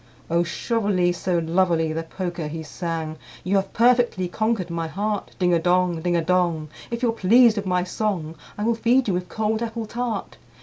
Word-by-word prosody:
II. 170 - +3
"O - - +4
Shovely 195 -1 0
so 175 0 -1
lovely!" 165 -1 +1
the 165 - -2
Poker 175 -1 -4
he 160 +1 -5
sang, 160 -1 -4 0.3
"You 195 +3 +2
have 195 0 -1
perfectly 240 -6 +3
conquered 215 -2 -1
my 165 -1 -2
heart. 205 +5 -2
Ding 180 -1 +2
a 170 - +4
dong, 175 -1 +2
ding 175 +1 0
a 170 - +1
dong! 170 -3 +1 0.2
If 235 +1 -4
you're 235 - +3
pleased 230 +2 +5
with 200 -1 -2
my 180 -1 +1
song, 180 -4 -2 0.2
I 210 - -3
will 230 +2 +2
feed 240 +3 +2
you 195 - +1
with 180 0 -3
cold 220 0 -1
apple 230 -1 -3
tart. 235 -1 -4
185 Hz, 200 wpm, -23 LUFS, 170-220 Hz, 0.3 s, pleased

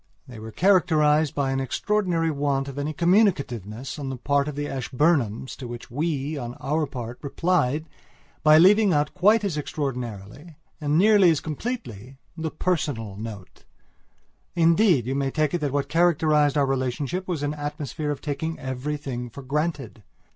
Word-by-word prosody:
They 120 -3 -10
were 110 +1 -8
characterized 155 - +3
by 140 -2 0
an 135 - 0
extraordinary 170 - 0
want 140 -2 -1
of 140 0 -6
any 145 +2 -2
communicativeness 140 - 0
on 140 -2 -4
the 130 - -4
part 140 +3 +1
of 150 - -4
the 145 0 -3
Ashburnhams 130 -3 0
to 130 - -7
which 120 -1 -9
we, 145 +1 -2
on 120 -1 -6
our 150 +2 -1
part, 120 -3 -7
replied 155 -1 0 0.6
by 155 0 +6
leaving 200 +3 +6
out 145 0 +1
quite 210 +4 +4
as 190 -7 -2
extraordinarily, 125 - -5 0.3
and 150 +1 +1
nearly 200 -1 +6
as 160 -3 +2
completely, 145 - -6 0.2
the 160 -1 -3
personal 145 - -2
note. 105 -3 -9 0.9
Indeed, 170 - +4
you 130 - -2
may 135 0 0
take 155 +1 0
it 175 - 0
that 145 -2 -1
what 140 0 -1
characterized 155 -2 +3
our 140 - +3
relationship 135 +7 -2
was 165 -6 -2
an 145 0 -1
atmosphere 150 0 -4
of 145 -2 -3
taking 160 +2 -3
everything 130 -2 -4
for 140 +4 -10
granted. 140 -4 -3
145 Hz, 160 wpm, -24 LUFS, 130-165 Hz, 0.9 s, by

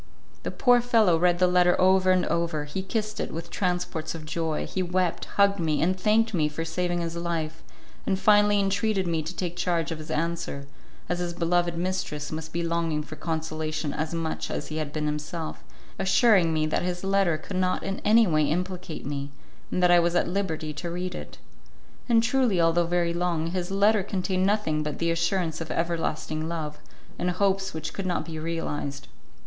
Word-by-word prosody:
The - - -3
poor 245 -1 +4
fellow 225 -7 +4
read 175 0 +3
the 180 - +4
letter 180 0 +4
over 185 0 +4
and 185 -1 +4
over; 170 -3 -1
he 150 +6 -4
kissed 215 +2 -3
it - - -2
with 165 +1 -6
transports 175 -4 -2
of 155 -2 -8
joy; 160 -1 -2
he 190 - -2
wept, 180 -1 0
hugged 200 -1 +4
me, 155 -3 +1
and 185 +3 +2
thanked 215 +4 +2
me 155 -4 +2
for 165 +2 -4
saving 175 +1 -1
his 165 0 -3
life, 165 -2 -3 0.5
and 190 - +2
finally 205 0 +5
entreated 195 0 +1
me 165 -2 0
to 160 +4 -6
take 175 -2 -3
charge 170 -3 0
of 160 - -4
his 155 +1 -9
answer, 165 -3 -2 0.4
as 175 - -1
his 175 -1 -2
beloved 175 0 +1
mistress 180 -4 -2
must 160 0 -5
be 170 +1 -2
longing 165 -2 0
for 155 - -9
consolation 155 -1 -3
as 155 0 -2
much 165 -1 -3
as - - -4
he 155 - -4
had 155 -2 -3
been 150 0 -2
himself, 150 +2 -4 0.4
assuring 195 -3 +4
me 155 -1 +1
that 155 - 0
his 175 0 -3
letter 195 -4 +2
could 185 +4 -6
not 185 0 0
in 195 0 -3
any 225 +2 +5
way 155 -5 +2
implicate 180 +2 -3
me, 140 0 -3 0.4
and 180 - 0
that 180 - +6
I 175 - +7
was 170 0 +1
at - - +2
liberty 165 -5 -2
to 170 +4 -5
read 180 +1 -3
it. - - -8 0.7
And 230 -1 +5
truly, 235 -6 +2
although 165 0 +3
very 170 -1 +1
long, 170 -2 -1
his 180 -1 -2
letter 200 +2 +3
contained 185 -1 0
nothing 200 -7 +1
but 150 -1 -3
the 170 0 +1
assurance 170 -1 0
of 160 - -5
everlasting 160 -2 -2
love, 150 -3 -4 0.4
and 180 - 0
hopes 190 0 0
which 160 -1 -4
could 195 -2 -3
not 180 - -1
be 160 -2 -6
realized. 145 -3 -4
170 Hz, 195 wpm, -26 LUFS, 160-185 Hz, 0.7 s, I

